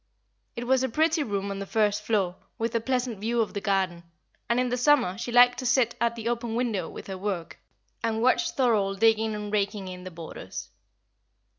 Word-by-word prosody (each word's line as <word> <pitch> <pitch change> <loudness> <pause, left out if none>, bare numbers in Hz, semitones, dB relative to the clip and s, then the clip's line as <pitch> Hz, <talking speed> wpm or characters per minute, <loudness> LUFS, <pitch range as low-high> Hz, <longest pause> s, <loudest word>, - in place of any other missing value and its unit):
It 240 - -4
was 260 +1 +3
a 260 - 0
pretty 315 +5 +2
room 200 -6 -2
on 195 - -4
the 200 - -5
first 210 -1 +1
floor, 200 -5 0 0.2
with 230 +1 -2
a 230 - +1
pleasant 250 -3 -1
view 230 +3 -1
of 225 - 0
the 200 - -3
garden, 190 -4 0 0.5
and 235 +1 +3
in 250 -1 +1
summer 250 -7 +3
she 240 - -5
liked 245 +1 +6
to 255 - -5
sit 245 -1 +3
at 235 0 +2
the 230 -1 -5
open 235 -1 -2
window 225 -8 -1
with - - -9
her 190 -1 -6
work, 190 -4 -4 0.4
and 225 -1 0
watch 255 +9 +3
Thorold 205 -7 +1
digging 220 0 +3
and 210 0 -5
raking 200 -1 -1
in 180 0 -8
the 185 - -6
borders. 165 -2 -8
225 Hz, 200 wpm, -27 LUFS, 200-245 Hz, 0.5 s, liked